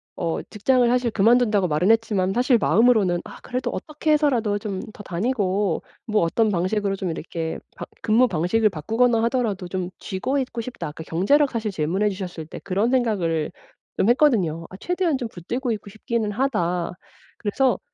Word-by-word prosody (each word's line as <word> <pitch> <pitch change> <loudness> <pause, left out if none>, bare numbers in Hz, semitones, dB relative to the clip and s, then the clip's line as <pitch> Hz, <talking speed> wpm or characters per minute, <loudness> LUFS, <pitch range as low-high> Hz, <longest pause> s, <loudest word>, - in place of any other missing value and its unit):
어 165 -1 -2
직장을 245 +3 +2
사실 245 -1 +2
그만둔다고 215 -2 +3
말은 155 +5 +1
했지만 210 -4 +1
사실 245 +2 +3
마음으로는 215 -7 +3
‘아 - - -10
그래도 255 0 -3
어떻게 305 0 -2
해서라도 240 -9 +2
좀 200 -3 -4
더 205 - -10
다니고 195 -2 0 0.3
뭐 215 -3 +2
어떤 215 +6 +2
방식으로 195 +2 0
좀 190 -2 -3
이렇게 160 0 -4 0.2
방 - - -6 0.2
근무 230 +4 +4
방식을 200 +4 +2
바꾸거나 225 +7 +1
하더라도 230 -7 -1
좀 180 0 -3
쥐고 260 +9 -2
있고 245 -3 -3
싶다.‘ 250 -7 -6
아까 155 +2 -8
경제력 270 - +2
사실 220 -3 -2
질문해 185 +6 0
주셨을 185 -4 -6
때 - - -8
그런 200 +4 +1
생각을 190 -11 +1 0.5
좀 - - +2
했거든요. 205 - +3
‘아 190 - -9
최대한 355 - 0
좀 245 -3 -4
붙들고 235 - -3
있고 205 -1 -7
싶기는 215 +1 -2
하다.‘ 180 -9 -1 0.4
그래서 230 +1 +1
210 Hz, 380 characters per minute, -23 LUFS, 185-245 Hz, 0.5 s, 근무